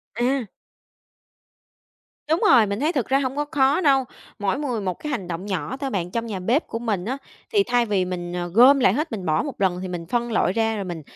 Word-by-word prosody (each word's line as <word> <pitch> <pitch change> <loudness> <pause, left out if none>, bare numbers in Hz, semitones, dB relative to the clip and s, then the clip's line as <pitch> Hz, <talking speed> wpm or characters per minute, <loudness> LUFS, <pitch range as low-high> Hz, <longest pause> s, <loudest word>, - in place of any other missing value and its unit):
À. 250 +2 +1 1.9
Đúng 320 - +3
rồi, 235 -4 +7
mình 200 +2 -3
thấy 310 +4 +1
thực 265 -6 -1
ra 270 +1 +3
hông 265 0 -2
có 295 0 -1
khó 285 +3 +3
đâu, 270 -4 +3 0.3
mỗi 205 +6 0
người 250 -7 -2
một 185 -2 -1
cái 300 - -5
hành 200 -9 -3
động 175 +3 -5
nhỏ 205 +6 -3
thôi 275 -1 -3
bạn. 180 -6 -3
Trong 230 0 -2
nhà 210 -5 -4
bếp 240 - 0
của 230 - -4
mình 210 -6 -2
á, 260 +4 -2 0.4
thì 405 -2 +4
thay 245 -8 +1
vì 195 -4 0
mình 175 -1 -5 0.2
gom 260 +6 +7
lại 195 -6 +4
hết, 305 +3 -2
mình 195 -5 -5
bỏ 155 -1 +1
một - - -7
lần 180 -2 +1
thì 190 - -4
mình 175 -2 -5
phân 240 +4 -1
loại 185 -4 +1
ra 225 0 +1
rồi 200 - -3
mình, 175 -3 -5
230 Hz, 235 wpm, -23 LUFS, 185-270 Hz, 1.9 s, rồi